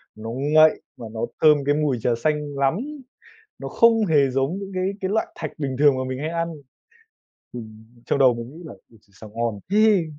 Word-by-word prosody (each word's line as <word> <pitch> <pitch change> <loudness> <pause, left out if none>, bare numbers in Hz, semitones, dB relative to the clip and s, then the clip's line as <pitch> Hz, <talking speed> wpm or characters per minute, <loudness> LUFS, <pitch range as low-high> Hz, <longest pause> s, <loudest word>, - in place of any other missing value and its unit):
nó 110 +1 -8
ngậy 150 +5 +3 0.2
mà 115 - -9
nó 110 0 -6 0.2
thơm 155 -1 +6
cái 145 +1 +2
mùi 150 -4 0
trà 120 +1 +1
xanh 150 -2 -1
lắm! 135 +2 +2 0.8
Nó - - -6
không 225 -2 +3
hề 145 -5 +3
giống 135 +8 -1
những 195 -1 -7
cái 185 +1 -1
cái 190 - -2
loại 220 - 0
thạch - - -5
bình 135 -3 -3
thường 145 -2 +5
mà 130 - -2
mình 130 0 -4
hay 155 +2 -3
ăn. 170 0 -3 1.0
Ừm, 110 -2 -10 0.2
trong - - 0
đầu 130 -3 +5
mình 115 0 -7
nghĩ 175 - -11
là 155 - -9
ôi 115 - -20
trời, 100 - -31
sao 110 - -11
ngon 115 -3 -2
thế! 210 -3 +4
145 Hz, 210 wpm, -23 LUFS, 125-165 Hz, 1.0 s, thơm